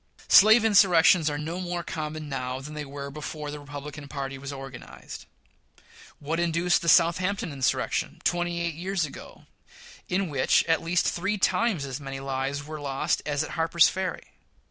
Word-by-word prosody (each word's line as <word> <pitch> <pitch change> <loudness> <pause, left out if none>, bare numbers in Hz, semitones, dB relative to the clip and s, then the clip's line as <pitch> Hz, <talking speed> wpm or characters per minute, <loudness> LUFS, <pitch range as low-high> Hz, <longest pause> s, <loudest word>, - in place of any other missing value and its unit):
Slave 220 +3 +7
insurrections 180 -5 +5
are 145 - -3
no 160 +4 -4
more 175 -1 -3
common 155 -1 -5
now 130 -2 -4
than 150 +3 -9
they 150 -1 -5
were 140 0 -7
before 150 0 -6
the 150 - -7
Republican 145 0 -8
party 135 -1 -5
was 140 +1 -6
organized. 135 -2 -10 0.9
What 160 +3 -3
induced 170 +1 +1
the 170 - 0
Southampton 180 +2 +3
insurrection, 135 -3 -1
twenty 175 0 0
eight 170 -1 -1
years 180 +2 -2
ago, 145 - -12 0.6
in 190 +1 0
which, 135 -3 +3
at 165 -1 +1
least, 170 +1 +1
three 200 +4 -1
times 200 -6 +1
as 135 +1 -5
many 135 -1 -6
lives 135 +1 -3
were 155 0 -7
lost 140 +3 -1
as 145 0 0
at - - -7
Harper's 165 +1 +4
Ferry? 185 -2 -4
155 Hz, 165 wpm, -26 LUFS, 140-175 Hz, 0.9 s, Slave